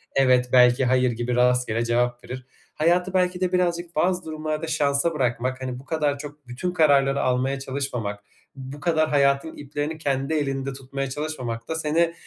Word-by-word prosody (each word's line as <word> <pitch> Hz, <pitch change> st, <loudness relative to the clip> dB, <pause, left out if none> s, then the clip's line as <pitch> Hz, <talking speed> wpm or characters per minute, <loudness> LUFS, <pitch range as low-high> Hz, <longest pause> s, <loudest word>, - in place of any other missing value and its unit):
evet, 125 Hz, -2 st, +4 dB
belki, 125 Hz, +1 st, +6 dB
hayır 125 Hz, 0 st, +3 dB
gibi 120 Hz, +1 st, -2 dB
rastgele 125 Hz, -2 st, +2 dB
cevap 120 Hz, +1 st, 0 dB
verir. 130 Hz, 0 st, -8 dB, 0.3 s
Hayatı 175 Hz, +4 st, +2 dB
belki 180 Hz, -1 st, +1 dB
de 185 Hz, -1 st, +1 dB
birazcık 175 Hz, -2 st, 0 dB
bazı 180 Hz, +3 st, +1 dB
durumlarda 155 Hz, 0 st, -3 dB
şansa 150 Hz, +1 st, +1 dB
bırakmak, 130 Hz, -1 st, -1 dB
hani, 125 Hz, -1 st, -4 dB
bu 135 Hz, -, -14 dB
kadar 150 Hz, -3 st, 0 dB
çok 145 Hz, -2 st, -10 dB
bütün 130 Hz, +9 st, -3 dB
kararları 140 Hz, -5 st, +3 dB
almaya 130 Hz, +2 st, 0 dB
çalışmamak, 125 Hz, -7 st, -4 dB, 0.3 s
bu 135 Hz, +1 st, -8 dB
kadar 155 Hz, -1 st, +1 dB
hayatın 140 Hz, +1 st, +2 dB
iplerini 145 Hz, +2 st, -4 dB
kendi 140 Hz, 0 st, -1 dB
elinde 135 Hz, -2 st, -1 dB
tutmaya 135 Hz, 0 st, -5 dB
çalışmamak 130 Hz, -6 st, -4 dB
da 160 Hz, -, -2 dB
seni 160 Hz, +2 st, +1 dB
140 Hz, 160 wpm, -24 LUFS, 125-155 Hz, 0.3 s, belki